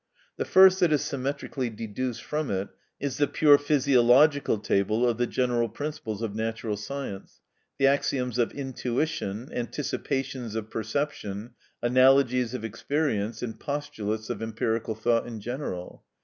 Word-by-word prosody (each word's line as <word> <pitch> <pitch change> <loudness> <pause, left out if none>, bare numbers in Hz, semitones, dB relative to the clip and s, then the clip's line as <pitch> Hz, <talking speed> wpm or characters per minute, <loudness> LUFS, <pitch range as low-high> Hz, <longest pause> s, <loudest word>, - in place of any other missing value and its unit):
The - - -1
first 190 0 +7
that 175 -4 +3
is 150 - +2
symmetrically 135 -1 -3
deduced 115 +2 -4
from 150 0 -2
it 95 0 -2 0.3
is 140 -2 -3
the 145 - +3
pure 145 -2 +5
physiological 140 -1 +4
table 105 +4 +1
of 120 -1 0
the 120 - +2
general 120 -2 0
principles 115 -4 -5
of 110 -3 -2
natural 110 0 -2
science—the 120 +3 -6
axioms 130 -3 +1
of 120 - +2
intuition, 130 -3 -3
anticipations 130 -2 -3
of 110 0 -4
perception, 110 -2 -3 0.3
analogies 130 0 +4
of 115 - -4
experience, 115 -2 -1
and 115 -2 -5
postulates 110 -7 -3
of 115 - -5
empirical 110 0 -2
thought 115 +2 +1
in 115 -2 -6
general. 115 -6 -5
120 Hz, 135 wpm, -27 LUFS, 110-140 Hz, 0.3 s, first